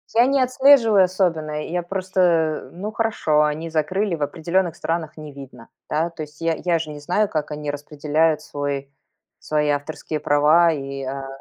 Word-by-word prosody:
я 235 +2 +6
не 275 +1 +2
отслеживаю 255 -6 +5
особенно. 160 -5 -1
Я 175 +1 -2
просто 175 -4 0
Ну, 200 +5 -5
хорошо, 215 -9 +1
они 150 +2 -2
закрыли, 170 +5 0
в 150 - -3
определенных 170 +3 -1
странах 165 -2 -3
не 155 -1 -9
видно, 130 -4 -12 0.2
да. 160 +3 0
То 165 -2 -7
есть 150 +1 -13
я, 165 0 +1
я 170 -2 +2
ж 160 - -5
не 150 -1 -8
знаю, 180 +8 0
как 155 -1 -3
они 150 -1 -3
распределяют 150 +2 0
свой 140 -1 -4 0.5
свои 150 -1 0
авторские 150 +1 -3
права, 150 +4 +4
и, 140 -2 -5
а. 135 +1 -5
160 Hz, 170 wpm, -22 LUFS, 150-180 Hz, 0.5 s, я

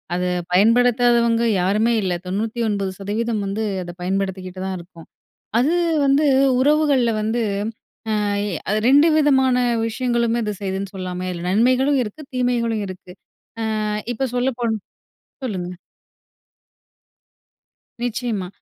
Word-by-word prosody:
அத 180 - -1 0.3
பயன்படுத்தாதவங்க 235 +3 +4 0.2
யாருமே 210 +6 +2
இல்ல. 185 - 0
99% 210 +1 -2
வந்து 200 +3 -2 0.2
அத 175 - -7
பயன்படுத்திக்கிட்டுதான் 190 0 -3
இருக்கோம். 170 -1 -14 0.5
அது 270 +7 +2 0.3
வந்து 275 +2 +3 0.4
உறவுகள்ல 285 -4 +3
வந்து 220 +3 0 0.8
அ - - 0 0.5
அது 210 +1 +2
2 290 +4 +6
விதமான 265 -4 +4 0.3
விஷயங்களுமே 235 0 0
அது 210 -1 -2
செய்துன்னு 195 0 -3
சொல்லாமே! 185 -1 -4
இதுல 175 -1 -6
நன்மைகளும் 255 +7 +3
இருக்கு. 215 +7 -8
தீமைகளும் 235 -3 0
இருக்கு. 185 -1 -10 0.7
அ - - -1 0.3
இப்ப 260 +3 -2
சொல்ல 250 +2 +1
போன் 230 -2 +1 0.7
சொல்லுங்க. 180 -6 -4 2.3
நிச்சயமா. 230 -5 -2
220 Hz, 105 wpm, -21 LUFS, 190-245 Hz, 2.3 s, 2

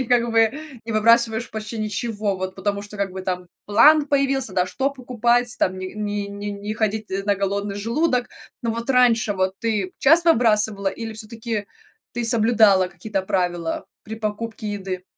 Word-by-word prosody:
и - - 0
как 235 0 +2
бы, 225 - +2
э, 225 0 +3 0.3
не 230 - -4
выбрасываешь 230 +1 +3
почти 220 +1 -6
ничего. 215 -1 -2
Вот 185 0 -4
потому 200 0 -2
что, 205 +1 -9
как 200 -1 -1
бы, 190 - -6
там 180 -1 -3 0.2
план 290 +9 +6
появился, 275 -5 +1
да, 180 -1 +1
что 270 +8 -1
покупать, 245 -2 0
там 185 0 0
ни 185 - -4
ни 205 -1 -3
ни 200 0 -7
не 205 +1 -5
ходить 215 0 -1 0.2
на 205 0 +2
голодный 200 +1 -2
желудок. 245 +4 0 0.3
Но 230 - 0
вот 230 +2 -4
раньше 240 -4 +4
вот 190 0 -1
ты 210 -5 -1
часто 330 +4 +5
выбрасывала 210 -4 +2
или 225 +3 -6
всё-таки 220 -1 -4 0.5
ты 240 0 -2
соблюдала 220 -5 +4
какие-то 190 +3 -4
правила 175 -3 -1 0.2
при 220 - -6
покупке 215 0 -4
еды? 190 -2 -5
215 Hz, 175 wpm, -22 LUFS, 200-235 Hz, 0.5 s, план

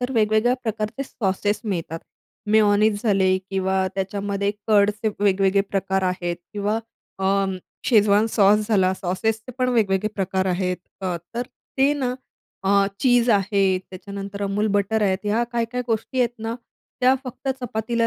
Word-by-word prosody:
तर 250 +1 -2
वेगवेगळ्या 220 +2 +3
प्रकारचे 220 +3 -3
सॉसेस 205 -4 -1
मिळतात. 170 -6 -3 0.5
मेयोनीज 210 -1 +4
झाले 190 -4 +3
किंवा 190 0 +1
त्याच्यामध्ये 200 +1 -1 0.2
कर्डचे 210 0 +3
वेगवेगळे 195 -1 +3
प्रकार 195 -1 0
आहेत 180 -2 -1 0.2
किंवा 210 +1 -1 0.4
अं, 195 0 +1 0.3
शेजवान 210 -2 +4
सॉस 210 -1 +3
झाला. 190 -4 +3
सॉसेसचे 220 +7 -2
पण 255 0 +2
वेगवेगळे 215 -4 +2
प्रकार 190 -1 -1
आहेत. 180 0 0 0.3
त - - -3 0.3
तर 240 - -1 0.4
ते 275 +2 +4
ना 255 -3 -1 0.5
अ, 200 0 +4
चीझ 245 -2 +4
आहे, 200 -1 +2 0.2
त्याच्यानंतर 200 +2 -8
Amul 200 +2 0
बटर 205 +2 +1
आहेत. 190 -2 +2
ह्या 215 +3 +1
काय-काय 235 +1 -1
गोष्टी 230 +3 -2
आहेत 240 -1 +1
ना, 225 +1 -3 0.5
त्या 255 +1 +5
फक्त 255 +2 -6
चपातीला 230 -1 -1
205 Hz, 140 wpm, -23 LUFS, 195-225 Hz, 0.5 s, त्या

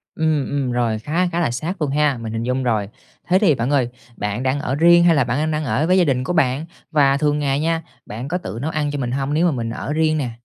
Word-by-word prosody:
Ừm, 155 -3 +1
ừm, 140 -3 -1
rồi, 115 -3 0
khá 165 +10 0
khá 170 - 0
là 155 - +1
sát 155 +8 -4
luôn 145 - 0
ha, 145 -3 +1
mình 110 -1 -6
hình 115 0 -3
dung 125 +2 -1
rồi. 110 -5 0 0.4
Thế 185 - +4
thì 190 -8 +4
bạn 120 +2 -2
ơi, 135 -4 +2 0.3
bạn 105 +4 -3
đang 130 +2 0
ở 135 -2 -2
riêng 170 +3 +5
hay 170 -2 +5
là 140 -4 +3
bạn 120 +2 -1
đang- 155 +1 0
đang 155 0 -1
ở 145 +3 0
với 185 +1 +3
gia 180 - +5
đình 130 -4 0
của 180 - -2
bạn? 140 -2 +1 0.3
Và 140 -3 +3
thường 150 +1 +1
ngày 140 -1 0
nha, 165 +1 0 0.2
bạn 120 +6 -6
có 180 - -1
tự 115 -10 -7
nấu 160 - -1
ăn 150 -2 -1
cho 145 - -4
mình 125 -3 -2
hông 140 +2 -1
nếu 170 +3 +3
mà 165 - +2
mình 115 -3 -3
ở 140 - -4
riêng 155 0 +1
nè? 125 -5 -2
145 Hz, 285 wpm, -20 LUFS, 125-160 Hz, 0.4 s, riêng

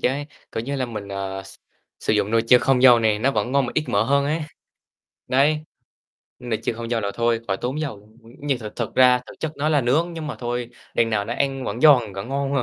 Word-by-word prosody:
chế, 140 +3 0 0.3
kiểu 115 - -3
như 140 +3 -3
là, 130 - -1
mình, 105 -4 -7
ờ, 95 -1 -4
s 95 - -12 0.5
sử - - 0
dụng 105 -1 +1
nồi 115 0 +3
chiên 125 +1 +6
không 130 0 +2
dầu 125 -2 +8
này, 110 -2 +2
nó 130 +5 +2
vẫn 130 -2 -1
ngon 140 -2 +2
mà 120 - -5
ít 155 - +1
mỡ 100 - +2
hơn 140 +4 +2
ấy, 155 +3 -1 0.9
đấy. 150 +4 +2 0.8
Nồi 120 -3 -3
chiên - - -1
không 115 0 -6
dầu 115 - +1
là 100 -2 -2
thôi, 115 -1 +1
khỏi 95 -1 0
tốn 130 +8 -3
dầu 140 -8 -3
luôn, 105 +2 -22 0.2
nhưng 140 -3 -1
thực 110 -3 -9
thực 115 - -4
ra, 125 -1 +5
thực - - -11
chất 160 -1 -3
nó 150 +2 0
là 150 -2 +3
nướng, 155 +8 +1
nhưng 160 -2 -6
mà 150 - -5
thôi, 120 0 -3 0.2
đằng 115 -1 +2
nào 105 -2 0
nó 120 +3 -4
ăn 135 -1 -1
vẫn 115 +2 -4
giòn, 125 -9 +5
vẫn 95 +4 -6
ngon 140 0 -2
mà. 135 - +2
125 Hz, 255 wpm, -22 LUFS, 110-140 Hz, 0.9 s, dầu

